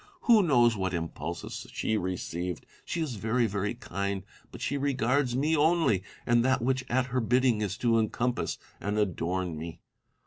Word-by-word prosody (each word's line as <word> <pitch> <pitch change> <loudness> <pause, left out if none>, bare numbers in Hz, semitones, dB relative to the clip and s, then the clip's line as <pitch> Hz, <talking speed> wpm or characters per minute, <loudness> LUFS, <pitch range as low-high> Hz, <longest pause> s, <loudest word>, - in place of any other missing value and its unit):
Who 230 -3 +6
knows 120 - +4
what 95 -3 -1
impulses 85 0 -5
she 110 - 0
received 90 -2 -3
1 - - -36 0.2
She 170 - -2
is 135 -8 -3
very, 115 +4 +1
very 105 +1 -1
kind: 100 -4 -3 0.3
but - - -9
she 140 - -1
regards 135 -2 +1
me 150 +5 +2
only, 155 - +3 0.2
and 120 0 +4
that 130 -1 +2
which 130 +1 +1
at 125 +1 +2
her 130 - +2
bidding 125 -1 +3
is 100 -2 -2
to 115 -1 +3
encompass 120 +3 -1 0.2
and 105 +1 -2
adorn 90 -4 -1
me. 80 0 -7
115 Hz, 170 wpm, -29 LUFS, 95-130 Hz, 0.3 s, Who